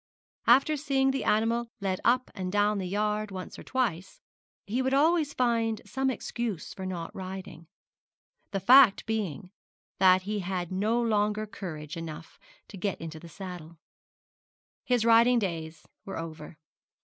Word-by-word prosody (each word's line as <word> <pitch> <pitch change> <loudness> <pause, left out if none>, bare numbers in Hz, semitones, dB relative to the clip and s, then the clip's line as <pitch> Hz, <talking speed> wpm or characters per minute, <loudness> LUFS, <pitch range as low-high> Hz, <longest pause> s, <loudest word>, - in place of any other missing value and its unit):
After 275 +5 +5
seeing 270 -2 +1
the 270 - -2
animal 230 +2 +1
led 190 -2 -2
up 255 +2 +2
and 185 -1 -4
down 205 0 +2
the 185 - -3
yard 210 +2 -1
once 185 -2 -7
or - - -9
twice, 210 -9 -2 0.5
he 235 +6 -1
would 265 +1 +1
always 310 +1 +3
find 230 -3 +1
some 265 0 -1
excuse 235 -7 -4
for 190 -1 -6
not 170 -3 -5
riding; 185 -3 -8 0.8
the 195 - -2
fact 250 0 +7
being 195 - -3 0.5
that 185 -1 +5
he 210 +2 -2
had 180 -2 -3
no 210 +5 +1
longer 215 -2 +1
courage 170 -9 -7
enough 165 -1 -8 0.3
to 200 - -9
get 195 0 -2
into 160 -1 -7
the 170 - -12
saddle. 175 -3 -9 1.1
His 245 -3 +1
riding 235 +2 +6
days 165 -6 -3 0.2
were 195 - -6
over. 155 -1 -8
205 Hz, 150 wpm, -28 LUFS, 180-235 Hz, 1.1 s, fact